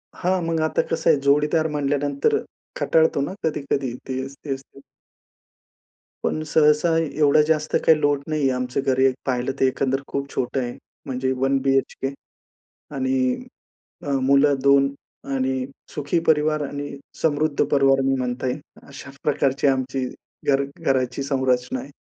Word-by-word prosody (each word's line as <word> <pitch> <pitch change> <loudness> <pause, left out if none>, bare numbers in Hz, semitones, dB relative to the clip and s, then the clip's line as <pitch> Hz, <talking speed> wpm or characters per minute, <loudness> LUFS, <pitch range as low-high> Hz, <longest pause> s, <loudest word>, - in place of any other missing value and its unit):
हां 185 0 0
मग 165 0 -1
आता - - +1
कसं 165 - +1
आहे, 145 - +5
जोडीदार 150 +3 +3
म्हणल्यानंतर 145 0 +1 0.4
कंटाळतो 160 -3 +3
ना 145 +7 -2
कधी-कधी 140 -4 -1
तेच, 130 +1 -4
तेच 135 -2 -3
ते. 135 - -19 1.4
पण 155 - -1
सहसा 150 +2 +4
एवढा 150 -2 +3
जास्त 155 -1 +1
काही 160 -1 +6
लोड 145 -1 +1
नाहीये 155 -3 +1
आमचं 125 +1 -2
घर 130 -1 +1
एक 130 -1 +4
पाहिलं 125 0 0
तर, - - +4
एकंदर 135 +1 0
खूप 140 0 -3
छोटं 130 +2 -1
आहे. 120 -1 -4 0.3
म्हणजे 130 -1 -1
वन 135 +1 +2
बीएचके 135 0 0 0.8
आणि 130 - 0 0.6
अ, 145 - -3 0.2
मुलं 140 +1 +5
2 140 0 +4 0.4
आणि 130 -1 0 0.3
सुखी 150 +4 0
परिवार 155 0 +3
आणि 145 0 -6 0.2
समृद्ध 150 -1 +1
परिवार 135 -1 +4
मी 135 0 +2
म्हणता 125 0 -2
येईल 125 +4 -2 0.3
अशा 140 0 -10
प्रकारची 140 -1 +1
आमची 130 -1 0 0.5
घर 135 0 +3 0.2
घराची 130 0 0
संरचना 130 -2 0
आहे. 135 - -9
140 Hz, 140 wpm, -23 LUFS, 130-150 Hz, 1.4 s, काही